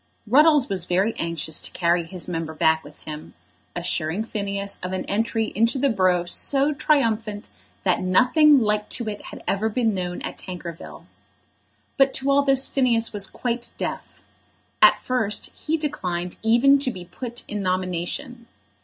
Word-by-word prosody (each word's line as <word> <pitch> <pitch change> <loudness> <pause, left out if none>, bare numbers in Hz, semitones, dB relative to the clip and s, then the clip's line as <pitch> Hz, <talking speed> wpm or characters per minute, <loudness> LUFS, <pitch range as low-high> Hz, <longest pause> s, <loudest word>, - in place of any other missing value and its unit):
Ruddles 290 +3 +5
was 185 -4 -2
very 190 +5 +1
anxious 165 -2 -1
to - - -1
carry 170 0 +1
his 175 +1 -2
member 165 -2 -4
back 160 +1 +2
with 150 - -15
him, 155 0 -9 0.4
assuring 160 +7 -1
Phineas 200 -2 -4
of 180 +1 -4
an 185 - -3
entry 225 +1 -1
into 230 +5 +2
the 275 0 +2
borough 185 -4 +2
so 275 +10 +2
triumphant 225 -8 0 0.3
that - - +1
nothing 260 - +5
like 210 -1 0
to 235 - -2
it 205 -1 -6
had - - -10
ever 210 +3 0
been 225 -1 0
known 180 -2 -3
at - - -6
Tankerville. 175 -3 -8 0.9
But 270 0 +3
to 270 +1 +1
all 280 +1 +4
this 270 -1 +3
Phineas 235 -4 +1
was 200 -2 -1
quite 240 -1 -4
deaf. - - -6 0.6
At - - +7
first 235 -5 -1
he 320 +1 -2
declined 180 - -3
even 240 +5 +4
to 275 - +1
be 185 -7 -7
put 240 +6 -7
in 210 -1 -4
nomination. 185 +6 -3
210 Hz, 160 wpm, -23 LUFS, 180-255 Hz, 0.9 s, At